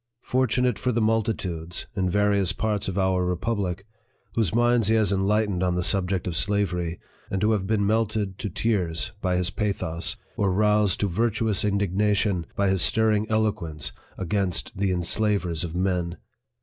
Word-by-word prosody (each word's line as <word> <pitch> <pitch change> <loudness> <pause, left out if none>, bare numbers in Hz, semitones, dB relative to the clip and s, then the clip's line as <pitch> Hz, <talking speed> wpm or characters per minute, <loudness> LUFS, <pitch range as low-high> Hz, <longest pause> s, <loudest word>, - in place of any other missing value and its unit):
fortunate 125 -2 +1
for 125 - 0
the 120 - 0
multitudes, 105 -7 -1
in 95 -2 0
various 100 -1 +2
parts 105 -2 -1
of 95 0 -3
our 95 -1 +2
republic, 90 0 -2 0.5
whose 110 -7 +1
minds 120 -1 +3
he 110 - +4
has 105 -3 +2
enlightened 100 -1 +1
on 90 -1 +1
the 90 - 0
sub 95 -1 +1
ject 95 -2 -1
of 90 - -3
slavery, 90 -2 0 0.3
and 95 +1 -1
who 110 - +3
have 100 -3 0
been 105 -2 +1
melted 105 -2 0
to 105 - -3
tears 95 -1 -1
by 90 -1 +1
his 90 -1 0
pathos, 90 -6 -2 0.2
or 100 -2 +2
roused 105 0 +2
to 105 - +1
virtuous 110 +1 0
indignation 100 -2 +1
by 100 - +1
his 95 -1 +2
stir 110 +5 +3
ring 105 0 +1
eloquence 105 -8 -1 0.3
against 90 -6 -1
the 95 0 0
enslavers 90 -1 +1
of 85 -1 -5
men 90 -2 -1
100 Hz, 165 wpm, -25 LUFS, 90-110 Hz, 0.5 s, he